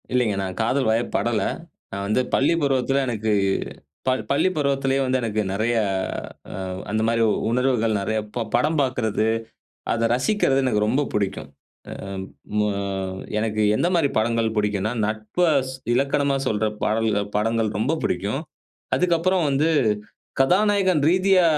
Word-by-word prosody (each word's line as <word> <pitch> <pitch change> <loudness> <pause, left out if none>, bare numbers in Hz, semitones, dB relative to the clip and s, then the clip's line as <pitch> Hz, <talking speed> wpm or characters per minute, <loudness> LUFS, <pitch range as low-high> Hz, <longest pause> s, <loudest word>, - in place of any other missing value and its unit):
இல்லங்க. 120 -5 +2
நான் 95 -1 -5
காதல் 130 +3 +1
வய 115 +1 +2
படல. - - +1 0.5
"நான் 100 0 -4
வந்து 110 +5 +2
பள்ளி 140 +5 +3
பருவத்தில, 135 0 +1
எனக்கு 110 -2 -1 0.8
பள் 130 0 +2
பள்ளி 145 +6 +3
பருவத்திலேயே 135 -2 +1
வந்து 130 0 +1
எனக்கு 110 -2 -1
நிறைய 110 +4 0 0.8
அ - - -7 0.4
அந்த 110 +1 0
மாரி 115 0 +2 0.3
உணர்வுகள் 120 -3 +1
நிறைய 110 +2 -1 0.2
ப 120 -2 -1
படம் 155 +2 +2
பாக்கறது, 110 -5 0 0.7
அத 115 0 +1
ரசிக்குறது 135 - +2
எனக்கு 105 -5 +2
ரொம்ப 130 +7 +2
பிடிக்கும்." 95 -8 -2 0.4
அ 100 0 -7 0.4
மு 105 - +3 0.7
எனக்கு 110 0 0
எந்த - - +1
மாரி 165 -5 +3
படங்கள் 115 0 +1
பிடிக்குன்னா 105 0 0
நட்பு 110 +11 -1 0.2
ஸ் - - -7 0.2
இலக்கணமா 140 +2 +1
சொல்ற 110 -2 +1 0.2
பாடல்கள் 110 -2 +1
படங்கள் 115 +1 +1
ரொம்ப 130 +9 +1
பிடிக்கும். 100 +9 -1 0.6
அதுக்கப்புறம் 180 0 +2
வந்து, 140 +4 +2 0.7
கதாநாயகன் 190 +1 +3
ரீதியா 185 0 +4
120 Hz, 135 wpm, -23 LUFS, 110-140 Hz, 0.8 s, ரீதியா